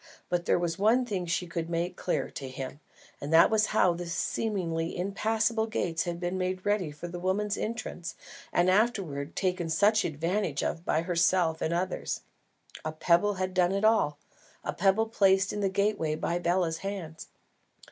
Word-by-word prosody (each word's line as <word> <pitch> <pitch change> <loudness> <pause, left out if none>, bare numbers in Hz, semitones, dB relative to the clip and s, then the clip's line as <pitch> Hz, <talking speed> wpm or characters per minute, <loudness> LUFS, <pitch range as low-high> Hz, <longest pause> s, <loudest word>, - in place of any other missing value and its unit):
But 175 -1 0
there - - +3
was 175 0 -2
one 230 +5 +4
thing 190 -6 -3
she 175 +1 0
could 170 -1 -4
make 170 +2 -1
clear, 180 - -2
to 135 -2 -6
him, 135 +1 -6 0.4
and 145 - -4
that 165 +5 +7
was 215 -1 +3
how 185 -4 +3
the 175 0 -6
seemingly 170 -2 -2
impassable 220 +4 0
gates 175 -7 -1
had 170 -1 -3
been 180 +1 -2
made 185 0 -2
ready 205 -5 +1
for 150 +4 -8
the 175 0 -6
woman's 200 +3 0
entrance 195 -6 -4 0.4
and 175 +1 +3
afterwards 185 -8 +1
taken 180 -3 -1
such 205 +7 +3
advantage 165 0 -1
of 165 - -2
by 160 - +1
herself 170 -1 +2
and 160 - 0
others. 180 +2 -2 0.6
A 155 - -2
pebble 170 +6 +2
had 185 0 -2
done 180 0 +3
it 200 +2 +1
all, 215 -10 +3 0.5
a - - -2
pebble 195 +4 +3
placed 195 -3 +3
in 210 - -3
the 195 -1 +1
gateway 200 -5 0
by 170 +2 -1
Bela's 175 -2 0
hands. 190 -5 -6
180 Hz, 175 wpm, -29 LUFS, 165-200 Hz, 0.6 s, that